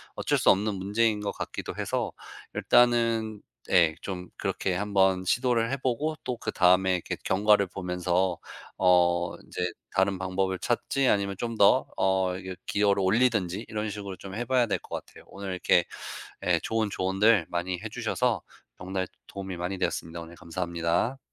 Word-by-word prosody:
어쩔 -, -, +1 dB
수 -, -, +3 dB
없는 105 Hz, +2 st, +1 dB
문제인 105 Hz, +3 st, +1 dB
것 100 Hz, -, -2 dB
같기도 -, -, -5 dB
해서 -, -, -1 dB, 0.4 s
일단은 115 Hz, -3 st, +3 dB, 0.3 s
예. 80 Hz, -3 st, +4 dB
좀 90 Hz, -2 st, -5 dB
그렇게 95 Hz, -, -1 dB
한번 95 Hz, -1 st, +2 dB
시도를 120 Hz, +3 st, +1 dB
해보고 135 Hz, +3 st, -1 dB
또 125 Hz, -, -1 dB
그다음에 95 Hz, -2 st, +3 dB
이렇게 90 Hz, -, -3 dB
경과를 105 Hz, 0 st, +4 dB
보면서 90 Hz, -1 st, -1 dB, 0.4 s
어 90 Hz, -1 st, +3 dB
인제 90 Hz, 0 st, -3 dB, 0.2 s
다른 95 Hz, 0 st, +2 dB
방법을 95 Hz, 0 st, -1 dB
찾을지 130 Hz, +4 st, 0 dB
아니면 100 Hz, -1 st, +1 dB
좀 115 Hz, -1 st, -3 dB
더 100 Hz, -, +5 dB
어 95 Hz, -1 st, +2 dB, 0.3 s
기여를 100 Hz, -1 st, +2 dB
올리든지 105 Hz, -1 st, +2 dB
이런 110 Hz, 0 st, -2 dB
식으로 100 Hz, -2 st, -6 dB
좀 95 Hz, -, -9 dB
해봐야 120 Hz, +1 st, +2 dB
될 -, -, 0 dB
것 -, -, -7 dB
같아요. -, -, -16 dB
오늘 100 Hz, -1 st, -7 dB
이렇게 90 Hz, -1 st, +3 dB, 0.6 s
예 -, -, +4 dB
좋은 110 Hz, -1 st, 0 dB
조언들 95 Hz, 0 st, +3 dB
많이 90 Hz, +1 st, -2 dB
해주셔서 -, -, -1 dB, 0.4 s
정말 95 Hz, +1 st, -3 dB, 0.2 s
도움이 95 Hz, -2 st, -6 dB
많이 90 Hz, +2 st, -3 dB
되었습니다. 85 Hz, -2 st, -2 dB
오늘 85 Hz, +1 st, -11 dB
감사합니다. 85 Hz, +7 st, -1 dB
95 Hz, 330 characters per minute, -27 LUFS, 90-110 Hz, 0.6 s, 더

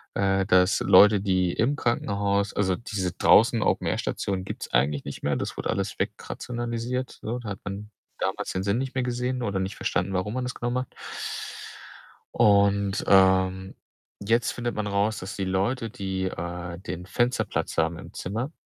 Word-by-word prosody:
äh, 95 Hz, -1 st, +2 dB
dass 90 Hz, +1 st, +4 dB
Leute, 100 Hz, +1 st, +6 dB
die 95 Hz, -3 st, +1 dB
im 135 Hz, +6 st, +1 dB
Krankenhaus 100 Hz, -5 st, 0 dB
also, 95 Hz, -3 st, +2 dB
diese 95 Hz, -4 st, -3 dB
draußen -, -, +5 dB
Open -, -, +1 dB
Air -, -, 0 dB
Stationen 95 Hz, -2 st, -2 dB
gibt's -, -, -6 dB
eigentlich 70 Hz, 0 st, +2 dB
nicht 70 Hz, -, -7 dB
mehr. 70 Hz, -1 st, +1 dB
Das -, -, -4 dB
wurde -, -, -3 dB
alles -, -, -2 dB
wegrationalisiert, 120 Hz, +1 st, -3 dB
so. 115 Hz, +3 st, -3 dB
Da 115 Hz, -3 st, -7 dB
hat 100 Hz, -1 st, -5 dB
man 105 Hz, +2 st, -6 dB, 0.3 s
damals -, -, -2 dB
den 95 Hz, -, -2 dB
Sinn 100 Hz, +4 st, +1 dB
nicht 135 Hz, 0 st, -4 dB
mehr 130 Hz, -, +1 dB
gesehen 125 Hz, +1 st, -2 dB
oder 100 Hz, -4 st, -1 dB
nicht 95 Hz, +2 st, -3 dB
verstanden, 95 Hz, +2 st, -1 dB
warum 95 Hz, +3 st, -1 dB
man 130 Hz, +1 st, -2 dB
das 125 Hz, -, -4 dB
genau 120 Hz, 0 st, -2 dB
macht. 125 Hz, +1 st, -2 dB, 1.5 s
Und, 100 Hz, -1 st, +3 dB
ähm, 95 Hz, 0 st, +4 dB, 0.5 s
jetzt 115 Hz, +4 st, +1 dB
findet 120 Hz, -1 st, -3 dB
man 105 Hz, -1 st, -2 dB
raus, 100 Hz, +1 st, 0 dB
dass 95 Hz, +2 st, -6 dB
die 95 Hz, -, -2 dB
Leute, 110 Hz, +6 st, 0 dB
die, 95 Hz, -2 st, -3 dB
äh, 85 Hz, -1 st, -5 dB
den 90 Hz, -1 st, -6 dB
Fensterplatz 120 Hz, +6 st, -1 dB
haben 80 Hz, 0 st, +1 dB
im -, -, -11 dB
Zimmer, 115 Hz, -, -3 dB
100 Hz, 175 wpm, -26 LUFS, 95-115 Hz, 1.5 s, Leute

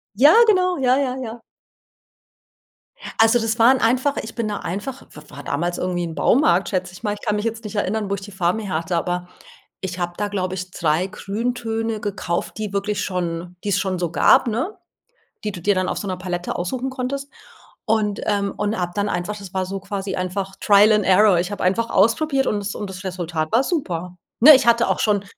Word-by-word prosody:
Ja, 280 Hz, +8 st, +7 dB
genau. 365 Hz, -3 st, +3 dB
Ja, 255 Hz, -2 st, +3 dB
ja, 265 Hz, -2 st, 0 dB
ja. 235 Hz, -2 st, -7 dB, 1.8 s
Also, 225 Hz, +2 st, +5 dB
das 225 Hz, +1 st, -1 dB
waren 255 Hz, +3 st, +6 dB
einfach 255 Hz, +5 st, +1 dB
Ich 220 Hz, -, -9 dB
bin 230 Hz, -2 st, -2 dB
da 205 Hz, -1 st, -3 dB
einfach 205 Hz, +10 st, -5 dB
w 150 Hz, -, -12 dB
war 145 Hz, -, -10 dB
damals 175 Hz, +6 st, -2 dB
irgendwie 180 Hz, -1 st, -2 dB
'n 165 Hz, -1 st, -6 dB
Baumarkt, 190 Hz, -, +3 dB
schätze 185 Hz, -2 st, -2 dB
ich 185 Hz, -, -13 dB
mal. 205 Hz, -2 st, 0 dB
Ich 205 Hz, -, -9 dB
kann 210 Hz, -2 st, +1 dB
mich 210 Hz, +1 st, -2 dB
jetzt 230 Hz, 0 st, -3 dB
nicht 210 Hz, 0 st, -7 dB
erinnern, 205 Hz, +1 st, -1 dB
wo 200 Hz, -, 0 dB
ich 200 Hz, -, -8 dB
die 205 Hz, +1 st, -10 dB
Farben 185 Hz, +2 st, 0 dB
herhatte. 175 Hz, -4 st, -2 dB
Aber 175 Hz, +1 st, -2 dB, 0.5 s
ich 185 Hz, -1 st, -5 dB
habe 175 Hz, 0 st, -2 dB
da, 205 Hz, -, -1 dB
glaube 185 Hz, -2 st, -2 dB
ich, 185 Hz, 0 st, -6 dB
3 165 Hz, +2 st, 0 dB
Grüntöne 225 Hz, +2 st, -3 dB
gekauft, 195 Hz, -4 st, -3 dB
die 210 Hz, -2 st, -4 dB
wirklich 205 Hz, +1 st, -1 dB
schon 175 Hz, -1 st, -3 dB
die 205 Hz, -, -2 dB
es 200 Hz, -1 st, +2 dB
schon 185 Hz, -2 st, -2 dB
so 175 Hz, -2 st, -2 dB
gab, 210 Hz, -, +5 dB
ne? 260 Hz, -, -2 dB, 0.7 s
Die 210 Hz, -, -2 dB
du 180 Hz, -3 st, -8 dB
dir 205 Hz, +3 st, +2 dB
dann 185 Hz, 0 st, 0 dB
auf -, -, -2 dB
so 205 Hz, -, -4 dB
'ner 185 Hz, -1 st, -3 dB
Palette 180 Hz, -1 st, -4 dB
aussuchen 250 Hz, +9 st, -3 dB
konntest 275 Hz, +2 st, -4 dB, 0.5 s
und 210 Hz, -2 st, 0 dB
ähm, 200 Hz, -1 st, 0 dB
und 210 Hz, +1 st, -1 dB
habe 175 Hz, -1 st, -2 dB
dann 205 Hz, 0 st, 0 dB
einfach, 180 Hz, +4 st, -3 dB
das 195 Hz, -3 st, -10 dB
war 190 Hz, -1 st, -1 dB
so 195 Hz, +1 st, -5 dB
quasi 195 Hz, 0 st, -4 dB
einfach 190 Hz, +1 st, -3 dB
Trial 205 Hz, +1 st, +6 dB
and 210 Hz, -2 st, +3 dB
Error. 190 Hz, -1 st, +5 dB
Ich 180 Hz, +3 st, -2 dB
habe 205 Hz, -, -4 dB
einfach 225 Hz, +6 st, +1 dB
ausprobiert 270 Hz, +6 st, +2 dB
und 210 Hz, -, 0 dB
das 205 Hz, 0 st, -4 dB
und 205 Hz, -, -5 dB
das 185 Hz, 0 st, -8 dB
Resultat 175 Hz, -4 st, -3 dB
war 240 Hz, +4 st, +4 dB
super. 180 Hz, -, -3 dB, 0.3 s
Ne, 305 Hz, +2 st, +11 dB
ich 260 Hz, -, +2 dB
hatte 235 Hz, 0 st, +4 dB
auch -, -, 0 dB
schon 205 Hz, -2 st, +1 dB
205 Hz, 215 wpm, -21 LUFS, 180-225 Hz, 1.8 s, Ne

